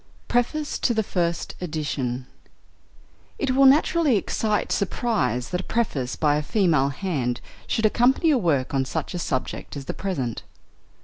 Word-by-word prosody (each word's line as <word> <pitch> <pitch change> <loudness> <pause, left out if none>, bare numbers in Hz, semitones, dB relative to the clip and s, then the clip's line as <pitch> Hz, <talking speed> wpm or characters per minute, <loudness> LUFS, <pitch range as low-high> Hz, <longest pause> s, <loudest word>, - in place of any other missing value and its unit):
PREFACE 285 +5 0
TO 240 - +1
THE 220 - +2
FIRST 170 -4 -1
EDITION 145 -7 -3 1.1
It 275 - 0
will 270 +1 +6
naturally 295 -2 +4
excite 210 +1 -1
surprise 200 - 0
that 180 0 -1
a - - -11
preface 150 - -1
by 150 -2 +2
a - - 0
female 160 - +2
hand 135 -6 -2 0.3
should 220 - 0
accompany 250 +9 +3
a 280 - +4
work 145 - 0
on 135 -1 +2
such 130 - -4
a 175 - -3
subject 135 -1 -3
as 140 - -7
the - - -3
present. 135 - -3
180 Hz, 150 wpm, -24 LUFS, -, 1.1 s, will